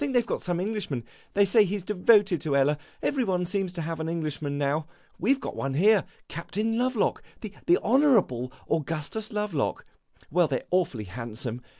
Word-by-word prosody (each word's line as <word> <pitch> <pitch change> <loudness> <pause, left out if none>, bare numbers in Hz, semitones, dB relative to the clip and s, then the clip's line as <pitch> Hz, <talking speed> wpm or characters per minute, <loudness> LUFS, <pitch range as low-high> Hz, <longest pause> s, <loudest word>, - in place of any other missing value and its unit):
They 265 -4 +3
've 235 - -2
got - - -2
some 175 -2 -1
Englishman. 190 - -2 0.3
They 200 0 +5
say 215 +3 +5
he 205 +1 -1
's 195 - -7
devoted 200 -3 +4
to 150 -3 0
Ella. 145 +2 +2 0.2
Every 270 -3 +1
one 180 -4 0
seems 185 0 -1
to 170 -2 -4
have 165 0 -4
an 160 0 -2
Englishman, 155 -3 -3
now. 145 +2 0 0.3
We 215 +9 +2
've 275 - +2
got - - -6
one 135 -1 -2
here, 205 +5 +4 0.2
Captain 215 +6 -2
Lovelock, 245 -2 +1 0.2
the 215 -3 -7 0.3
Honourable 220 - +3 0.2
Augustus 165 +7 -2
Lovelock. 210 -9 -1 0.5
Well, 175 +1 +4
they 135 -4 -1
're - - -24
awfully 175 -11 +1
handsome. 115 +4 -5
180 Hz, 185 wpm, -27 LUFS, 145-210 Hz, 0.5 s, They